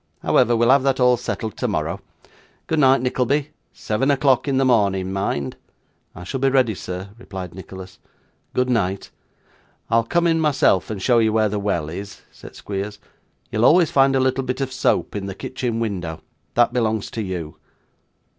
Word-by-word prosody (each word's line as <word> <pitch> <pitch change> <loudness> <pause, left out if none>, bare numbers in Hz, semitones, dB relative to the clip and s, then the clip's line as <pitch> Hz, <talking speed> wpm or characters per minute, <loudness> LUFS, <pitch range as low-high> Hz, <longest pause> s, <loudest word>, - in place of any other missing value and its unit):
However, 120 -2 +3
we'll 120 +2 +4
have 140 0 +5
that 135 0 +1
all 125 0 +5
settled 115 -2 -4
tomorrow. - - -2 0.6
Good 160 - 0
night, 135 -2 +5
Nickleby. 135 +3 0 0.2
Seven 115 +6 -1
o'clock 135 -1 +3
in 135 -2 +1
the 135 - +3
morning, 100 -6 +2
mind.' 70 -9 -2 0.6
'I 90 - -9
shall 130 +9 -4
be 135 +1 +3
ready, 130 -4 +2
sir,' 90 0 -6
replied 95 -7 -8
Nicholas. 95 0 -10 0.6
'Good 125 0 +2
night.' 100 -6 -1 0.8
'I'll 115 0 +3
come 170 +8 +1
in 165 -1 +3
myself 140 - +2
and 110 -3 -4
show 120 +4 +3
you 110 -1 +3
where 110 -1 +2
the 105 0 -2
well 100 -7 -1
is,' 100 +5 -8
said - - -13
Squeers. 100 +1 -5 0.5
'You'll 110 - 0
always 170 +4 +5
find 135 0 +4
a - - +3
little 130 0 +1
bit 125 +1 -3
of 135 -1 -3
soap 130 - 0
in 100 -1 -4
the 95 - -6
kitchen 120 0 -3
window; 90 -8 -3 0.3
that 120 0 +3
belongs 110 -4 -1
to 115 - -4
you. 85 -6 -5
115 Hz, 175 wpm, -21 LUFS, 95-130 Hz, 0.8 s, have